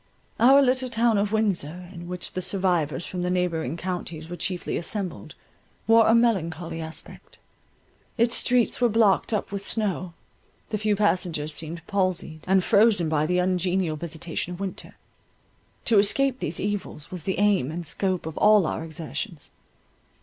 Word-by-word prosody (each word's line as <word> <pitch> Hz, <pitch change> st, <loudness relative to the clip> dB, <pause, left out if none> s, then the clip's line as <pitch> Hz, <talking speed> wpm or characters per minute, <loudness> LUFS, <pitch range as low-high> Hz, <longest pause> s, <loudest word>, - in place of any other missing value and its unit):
Our 270 Hz, +4 st, +7 dB
little 255 Hz, 0 st, +1 dB
town 230 Hz, -2 st, +2 dB
of 205 Hz, 0 st, 0 dB
Windsor, 180 Hz, -6 st, -1 dB
in 170 Hz, -1 st, -9 dB
which 180 Hz, 0 st, -5 dB
the 185 Hz, -, -4 dB
survivors 175 Hz, -6 st, 0 dB
from 180 Hz, -, -5 dB
the 180 Hz, -, -1 dB
neighbouring 170 Hz, -5 st, -1 dB
counties 170 Hz, -3 st, -5 dB
were 175 Hz, -, -5 dB
chiefly 180 Hz, +1 st, -3 dB
assembled, 190 Hz, +1 st, -4 dB, 0.5 s
wore 225 Hz, 0 st, +5 dB
a 225 Hz, -, +5 dB
melancholy 170 Hz, -8 st, 0 dB
aspect. 160 Hz, 0 st, -8 dB, 0.8 s
Its 235 Hz, 0 st, +3 dB
streets 250 Hz, 0 st, +2 dB
were 240 Hz, -, +4 dB
blocked 215 Hz, -2 st, +3 dB
up 210 Hz, -3 st, -2 dB
with 200 Hz, -1 st, -4 dB
snow—the 200 Hz, 0 st, -4 dB
few 215 Hz, 0 st, +1 dB
passengers 175 Hz, -7 st, 0 dB
seemed 160 Hz, +2 st, -4 dB
palsied, 185 Hz, -5 st, -2 dB
and 190 Hz, 0 st, +3 dB
frozen 200 Hz, -6 st, +4 dB
by 155 Hz, -1 st, +1 dB
the 180 Hz, +1 st, +1 dB
ungenial 180 Hz, -2 st, 0 dB
visitation 165 Hz, +2 st, -5 dB
of -, -, -13 dB
winter. 195 Hz, -2 st, -6 dB, 0.9 s
To 225 Hz, -3 st, +5 dB
escape 260 Hz, +6 st, +2 dB
these 165 Hz, -, -3 dB
evils 200 Hz, -7 st, -4 dB
was 180 Hz, -4 st, -7 dB
the 190 Hz, -, -1 dB
aim 200 Hz, -9 st, +2 dB
and 170 Hz, +2 st, -5 dB
scope 185 Hz, +2 st, -1 dB
of 160 Hz, -1 st, -6 dB
all 210 Hz, -3 st, +5 dB
our 160 Hz, -, -3 dB
exertions. 160 Hz, -1 st, -6 dB
185 Hz, 155 wpm, -25 LUFS, 165-210 Hz, 0.9 s, Our